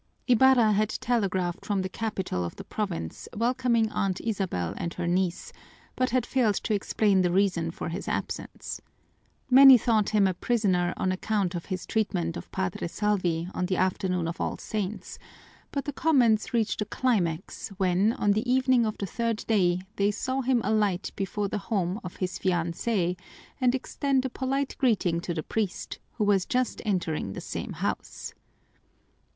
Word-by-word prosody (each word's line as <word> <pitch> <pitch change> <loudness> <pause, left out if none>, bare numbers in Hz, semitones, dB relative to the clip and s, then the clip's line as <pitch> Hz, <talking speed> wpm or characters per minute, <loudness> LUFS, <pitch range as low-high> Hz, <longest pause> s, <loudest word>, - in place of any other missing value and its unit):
Ibarra 250 -2 +5
had 210 +1 +2
telegraphed 190 -8 -1
from 200 -2 -1
the - - -1
capital 190 - -3
of 85 - -5
the - - -8
province 185 - -4
welcoming 235 -1 +2
Aunt 195 -1 -1
Isabel 190 - -2
and 170 - -3
her 175 - -3
niece, 175 0 -1 0.4
but 255 0 +1
had 250 -1 +1
failed 240 -6 +2
to 220 - -1
explain 200 -1 +2
the 180 - +2
reason 180 -3 +2
for 165 - -5
his 175 +4 -5
absence. - - -4 0.7
Many 265 0 +10
thought 220 -3 +2
him 210 -2 +3
a 190 - +2
prisoner 185 -4 +1
on 185 - 0
account 190 -1 -1
of 170 -2 -4
his 185 -2 -4
treatment 135 - -1
of 85 - -8
Padre 95 - -2
Salvi 180 -4 0
on 180 - -1
the 185 -1 0
afternoon 180 -2 0
of 165 - -4
All - - -2
Saints, 210 -1 -4 0.5
but 280 - -3
the 290 - -3
comments 250 -9 +3
reached 225 -2 0
a - - 0
climax 190 -10 -1
when, 190 +3 +2
on 205 - +1
the 220 +5 0
evening 255 -2 +3
of 215 - -3
the 200 - -3
third 230 +2 -2
day, 185 -4 +2
they 200 0 +3
saw 260 +6 -2
him 255 -2 +2
alight 205 -4 +1
before 200 +1 -2
the 205 - -3
home 190 -2 0
of 180 - -7
his 185 -1 -3
fiancée 180 +1 0 0.4
and 250 0 +3
extend 265 0 0
a 260 - -2
polite 270 +2 -2
greeting 195 -9 +2
to 175 - -4
the 155 - -2
priest, 215 -5 -3
who - - -1
was 200 -3 +2
just 255 0 0
entering 170 - -1
the - - -6
same - - -5
house. - - -4
205 Hz, 170 wpm, -27 LUFS, 180-230 Hz, 0.7 s, Many